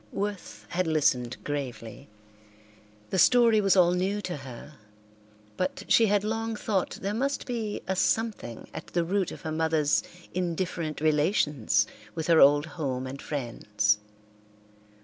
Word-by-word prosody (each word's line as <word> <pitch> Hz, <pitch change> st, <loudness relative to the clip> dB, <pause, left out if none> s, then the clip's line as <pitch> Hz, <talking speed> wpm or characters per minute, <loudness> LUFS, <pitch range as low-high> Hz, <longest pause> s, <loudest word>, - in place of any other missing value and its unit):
Worth 200 Hz, -1 st, -5 dB
had 180 Hz, 0 st, -1 dB
listened 130 Hz, -6 st, +1 dB
gravely. 135 Hz, -3 st, -5 dB, 1.0 s
The 190 Hz, -, +1 dB
story 230 Hz, +1 st, +5 dB
was 195 Hz, -1 st, +3 dB
all 175 Hz, -1 st, +6 dB
new 190 Hz, +3 st, 0 dB
to 180 Hz, -5 st, -4 dB
her, 135 Hz, +1 st, -10 dB, 0.8 s
but 185 Hz, +1 st, -2 dB
she 225 Hz, -, +5 dB
had 205 Hz, 0 st, +2 dB
long 225 Hz, +1 st, -2 dB
thought 205 Hz, -3 st, -1 dB
there 200 Hz, +1 st, -1 dB
must 275 Hz, +5 st, -1 dB
be 225 Hz, -4 st, -3 dB
a 190 Hz, -, 0 dB
something 205 Hz, -, -1 dB
at -, -, -7 dB
the 175 Hz, -, 0 dB
root 190 Hz, +1 st, 0 dB
of -, -, -9 dB
her 160 Hz, -, -4 dB
mother's 160 Hz, -2 st, +2 dB, 0.3 s
indifferent 170 Hz, -3 st, -2 dB
relations 150 Hz, -, +2 dB, 0.3 s
with 160 Hz, -, -3 dB
her 165 Hz, -1 st, +5 dB
old 145 Hz, +2 st, +6 dB
home 140 Hz, -5 st, -4 dB
and 135 Hz, +1 st, -7 dB
friends. 105 Hz, -6 st, -1 dB
165 Hz, 140 wpm, -27 LUFS, 145-200 Hz, 1.0 s, all